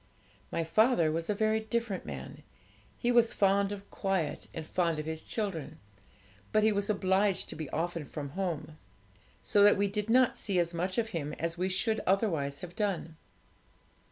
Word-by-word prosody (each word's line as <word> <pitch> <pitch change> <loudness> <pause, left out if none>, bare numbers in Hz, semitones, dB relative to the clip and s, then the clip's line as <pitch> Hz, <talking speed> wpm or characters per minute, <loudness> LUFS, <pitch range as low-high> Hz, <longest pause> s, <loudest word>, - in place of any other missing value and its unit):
'My 165 - 0
father 170 -1 +3
was 165 +3 -3
a 210 - +1
very 220 +1 +2
different 220 -2 -3
man; - - -7 0.6
he 240 - +1
was 235 -1 +4
fond 200 0 +3
of 200 -1 -7
quiet, 190 -6 -1
and 160 - -6
fond 170 -1 0
of 155 - -4
his 160 0 -4
children; 165 - -4 0.7
but 215 - +3
he 220 - +5
was 200 0 -1
obliged 195 -1 +1
to - - -6
be 155 -3 -5
often 170 -1 -2
from 145 0 -6
home, 160 -2 -4 0.6
so 205 - +3
that 205 0 +7
we 200 +1 +2
did 210 +2 -2
not 255 +1 +4
see 195 -3 -2
as 170 -1 +1
much 180 +2 -2
of 230 -1 +1
him 155 -7 -3
as 165 0 -3
we 180 +2 -1
should 220 +4 +1
otherwise 165 -8 +1
have 180 -1 -8
done. 185 -6 -2
190 Hz, 180 wpm, -31 LUFS, 165-210 Hz, 0.7 s, that